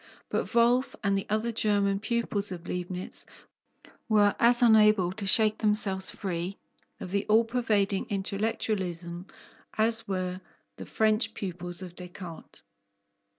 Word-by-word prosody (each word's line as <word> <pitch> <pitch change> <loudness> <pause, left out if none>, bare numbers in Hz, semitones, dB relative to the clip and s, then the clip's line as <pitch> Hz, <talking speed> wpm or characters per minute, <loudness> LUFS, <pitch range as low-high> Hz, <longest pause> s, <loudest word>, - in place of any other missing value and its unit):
But - - -2
Wolff 240 +3 +3
and 200 -1 +2
the 195 - -2
other 220 +3 0
German 205 -3 +1
pupils 215 -2 -2
of 175 -1 -7
Leibnitz 180 +1 -5 0.9
were 205 -2 +4
as 240 +1 +4
unable 215 -5 +5
to 195 +1 -5
shake 215 +2 +3
themselves 210 -3 +3
free 180 0 -4 0.4
of 180 - -7
the 200 0 0
all 220 +2 +4
pervading 215 -4 0
intellectualism 190 -3 -3 0.5
as 225 +1 +3
were 185 -1 -3 0.4
the - - -9
French 215 +1 +1
pupils 175 -1 -6
of 175 -1 -10
Descartes. 180 -2 -10
200 Hz, 125 wpm, -28 LUFS, 185-220 Hz, 0.9 s, unable